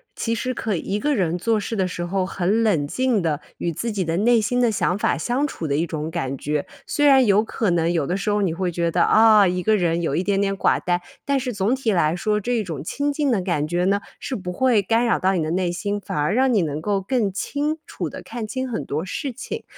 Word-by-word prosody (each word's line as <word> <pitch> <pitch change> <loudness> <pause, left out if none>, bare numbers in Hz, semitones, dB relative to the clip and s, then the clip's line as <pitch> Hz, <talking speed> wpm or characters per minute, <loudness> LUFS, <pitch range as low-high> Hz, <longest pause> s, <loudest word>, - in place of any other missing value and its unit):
其 230 0 -1
实 255 +3 -2
可 220 -4 -2
以 165 - -2
一 200 +2 -2
个 295 +4 +1
人 175 -4 0
做 220 +3 +1
事 215 +3 -4
的 190 -3 +1
时 175 -1 -4
候， 185 +1 -1
很 195 +4 0
冷 180 -10 +2
静 255 - +1
地 155 -4 0 0.2
与 170 - -2
自 230 +9 -3
己 200 -3 -1
的 165 +1 -1
内 230 +2 +4
心 245 +4 0
的 240 -2 +3
想 190 -2 0
法 205 - +1
相 250 - 0
处 170 - -6
的 140 - 0
一 165 +3 0
种 155 0 -4
感 135 -6 -3
觉。 150 +1 -2 0.2
虽 290 - 0
然 265 -2 +6
有 205 0 +4
可 220 -1 -1
能 170 -1 +2
有 165 -4 0
的 180 +6 -1
时 200 - -2
候 205 0 +1
你 180 -5 +1
会 180 0 -2
觉 170 0 -1
得， 170 0 +3
啊， 215 -2 +6
一 180 0 -1
个 215 +2 +3
人 170 -2 +1
有 150 -4 -1
一 175 - 0
点 200 0 +1
点 195 -1 +1
寡 - - +2
淡， 175 0 0 0.2
但 280 -1 +1
是 250 -2 -3
总 205 +5 +1
体 260 -4 0
来 170 -3 +2
说， 210 +3 0
这 245 +5 -3
一 230 -3 +1
种 160 -7 -6
清 285 - -1
静 285 -2 0
的 205 - +1
感 170 -5 -1
觉 175 +2 0
呢， 200 +2 +2 0.2
是 265 - -4
不 180 -4 -5
会 240 +1 +3
干 230 +4 +1
扰 235 - +2
到 190 +1 +1
你 180 - 0
的 155 +1 -2
内 180 0 0
心， 205 +4 -2
反 175 - -5
而 150 +6 +1
让 260 +2 +3
你 210 - +3
能 150 -1 -3
够 200 +1 0
更 220 -2 0
清 290 +10 -2
楚 - - -5
地 - - -8
看 230 -1 -6
清 260 +3 -3
很 230 - -3
多 155 +5 -3
事 275 +7 -4
情。 450 - -6
195 Hz, 290 characters per minute, -22 LUFS, 175-230 Hz, 0.2 s, 然